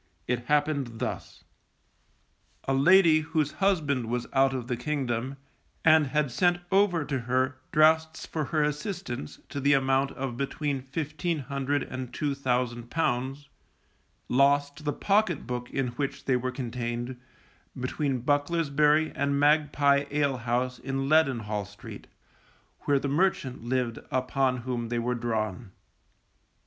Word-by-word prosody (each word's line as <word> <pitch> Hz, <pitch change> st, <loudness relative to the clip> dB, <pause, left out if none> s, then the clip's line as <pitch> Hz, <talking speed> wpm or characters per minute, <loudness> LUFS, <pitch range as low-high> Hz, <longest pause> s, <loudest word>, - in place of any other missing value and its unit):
It 120 Hz, 0 st, -1 dB
happened 145 Hz, -5 st, +1 dB
thus. 125 Hz, -, -5 dB, 1.2 s
A 135 Hz, -, -1 dB
lady 165 Hz, +3 st, +6 dB
whose 155 Hz, -2 st, -1 dB
husband 150 Hz, -, +1 dB
was 120 Hz, +1 st, -2 dB
out 135 Hz, 0 st, +4 dB
of 130 Hz, -3 st, -3 dB
the 125 Hz, 0 st, -2 dB
kingdom, 130 Hz, -1 st, -2 dB, 0.5 s
and 155 Hz, -2 st, +6 dB
had 150 Hz, -1 st, 0 dB
sent 175 Hz, +7 st, +2 dB
over 190 Hz, -5 st, +3 dB
to 140 Hz, -2 st, -2 dB
her 130 Hz, +2 st, 0 dB
draughts 160 Hz, +1 st, +3 dB
for 155 Hz, -2 st, -3 dB
her 155 Hz, +1 st, +1 dB
assistance 150 Hz, -, -4 dB
to 140 Hz, -, -4 dB
the 140 Hz, +1 st, +3 dB
amount 135 Hz, 0 st, +2 dB
of 130 Hz, -3 st, -4 dB
between 140 Hz, 0 st, -2 dB
fifteen 155 Hz, +5 st, -3 dB
hundred 140 Hz, 0 st, -2 dB
and 130 Hz, -1 st, -6 dB
two 145 Hz, +2 st, -1 dB
thousand 125 Hz, -3 st, -1 dB
pounds, 135 Hz, -2 st, -1 dB, 0.8 s
lost 145 Hz, +3 st, +2 dB
the 145 Hz, -, 0 dB
pocket 200 Hz, -2 st, +1 dB
book 125 Hz, -1 st, -4 dB
in 135 Hz, -2 st, -1 dB
which 135 Hz, +3 st, -4 dB
they 130 Hz, -, +2 dB
were 125 Hz, +1 st, -1 dB
contained, 120 Hz, 0 st, -4 dB, 0.6 s
between 130 Hz, 0 st, -2 dB
Bucklersbury 150 Hz, +1 st, +2 dB
and 140 Hz, 0 st, 0 dB
Magpie 145 Hz, -1 st, +3 dB
alehouse 130 Hz, -3 st, 0 dB
in 135 Hz, 0 st, -3 dB
Leadenhall 115 Hz, -10 st, +2 dB
Street, 105 Hz, 0 st, -11 dB, 0.8 s
where 145 Hz, -, +3 dB
the 140 Hz, -, -2 dB
merchant 140 Hz, -6 st, 0 dB
lived 125 Hz, -2 st, -1 dB
upon 130 Hz, -1 st, 0 dB
whom 120 Hz, -3 st, -3 dB
they 120 Hz, -, -1 dB
were 120 Hz, +1 st, 0 dB
drawn. 110 Hz, -3 st, -2 dB
135 Hz, 135 wpm, -27 LUFS, 125-150 Hz, 1.2 s, lady